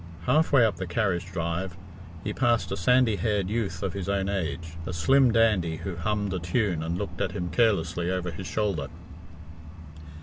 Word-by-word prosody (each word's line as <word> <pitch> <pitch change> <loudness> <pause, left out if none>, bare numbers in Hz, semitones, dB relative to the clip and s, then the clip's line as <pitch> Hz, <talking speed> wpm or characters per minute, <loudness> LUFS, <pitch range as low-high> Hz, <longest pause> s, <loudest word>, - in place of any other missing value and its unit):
Half 155 +5 +3
way 130 -5 +6
up 105 -6 0
the 95 0 -4
carriage 90 -1 0
drive 85 +1 -3 0.5
he - - -3
passed 120 -5 +1
a - - 0
sandy 115 +3 +3
haired 100 0 0
youth 110 -3 -2
of 95 -3 -2
his 100 -1 -4
own 100 -1 0
age, 85 -4 -3
a 90 - -3
slim 130 +10 +4
dandy 105 -8 +3
who 90 +2 -5
hummed 100 +3 -1
a 95 - -1
tune 85 0 0
and 85 +2 -2
looked 100 +1 -5
at - - -1
him 90 0 -3
carelessly 90 -7 +1
over 90 -1 -2
his 90 +3 -7
shoulder. 100 -10 -1
95 Hz, 180 wpm, -27 LUFS, 85-110 Hz, 0.5 s, way